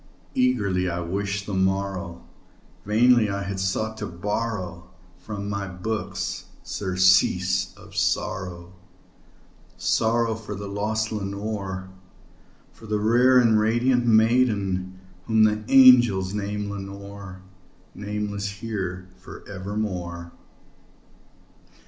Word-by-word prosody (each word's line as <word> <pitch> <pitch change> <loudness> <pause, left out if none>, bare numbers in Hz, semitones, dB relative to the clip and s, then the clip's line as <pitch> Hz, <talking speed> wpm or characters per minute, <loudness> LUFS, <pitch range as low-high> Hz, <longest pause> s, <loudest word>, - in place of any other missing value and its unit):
Eagerly 100 -8 +1
I 85 0 -3
wished 100 +3 -3
the 105 - -5
morrow; 95 -2 -1 0.6
vainly 115 +1 +4
I 100 0 -2
had 100 -1 -4
sought 110 +4 -1
to 105 -1 -4
borrow 90 -1 -4 0.3
From 100 -2 -6
my 100 -1 -3
books 90 0 -4 0.2
surcease 95 -1 +2
of - - -15
sorrow 90 -1 -2 1.0
sorrow 115 0 +1
for 110 -2 -7
the 100 +1 -6
lost 110 +2 -2
Lenore 100 -2 -4 0.8
For 110 - -14
the 105 0 0
rare 120 +4 +4
and 115 -3 +5
radiant 120 +3 +2
maiden 105 -5 +2 0.3
whom 110 -1 +4
the 105 0 +2
angels 120 -8 +6
name 105 0 -3
Lenore 100 -1 -8 0.5
Nameless 105 -1 -4
here 95 -3 -5
for 95 - -12
evermore. 95 -4 -4
100 Hz, 100 wpm, -24 LUFS, 95-110 Hz, 1.0 s, angels